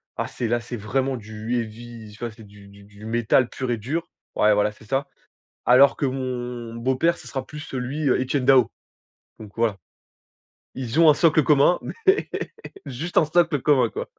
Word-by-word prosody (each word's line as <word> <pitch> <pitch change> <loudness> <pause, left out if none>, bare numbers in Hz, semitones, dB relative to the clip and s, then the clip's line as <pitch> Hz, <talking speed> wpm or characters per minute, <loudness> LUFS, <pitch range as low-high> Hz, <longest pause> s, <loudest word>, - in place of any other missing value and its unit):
Ah! - - -2
C'est 120 - -4
là, 120 +1 +1
c'est 120 +1 -6
vraiment 130 +5 -1
du, 110 +2 -6
heavy, 115 -1 -8
tu - - -14
vois? 120 -1 -4
C'est 110 - -20
c'est 110 - -12
du 100 0 -16
du 100 0 -16
du 105 +1 -14
métal 120 +2 +2
pur 130 -2 -5
et 120 - 0
dur. 150 +10 -4 0.3
Ouais, 105 0 +4
voilà, 105 +1 +2
c'est 110 +1 -18
ça, 135 +4 -1 0.6
alors 130 +3 +6
que 140 - -1
mon 125 -3 -4
beau-père, 130 +8 +1
ce - - -12
sera 135 -1 -4
plus, 150 -1 -9
lui, 135 +4 -2
Etienne 130 +1 0
Daho, 130 -4 +5 0.7
donc 105 -2 -10
voilà, 115 -4 +1 1.0
ils 130 +3 -3
ont 165 -2 +7
un - - +5
socle 160 -1 +4
commun 150 +4 +4
mais 400 -3 +1 0.7
juste 140 +7 -2
un - - +5
socle 165 -3 +2
commun, 145 -4 +3
quoi. 470 +4 -6
125 Hz, 190 wpm, -23 LUFS, 110-140 Hz, 1.0 s, ont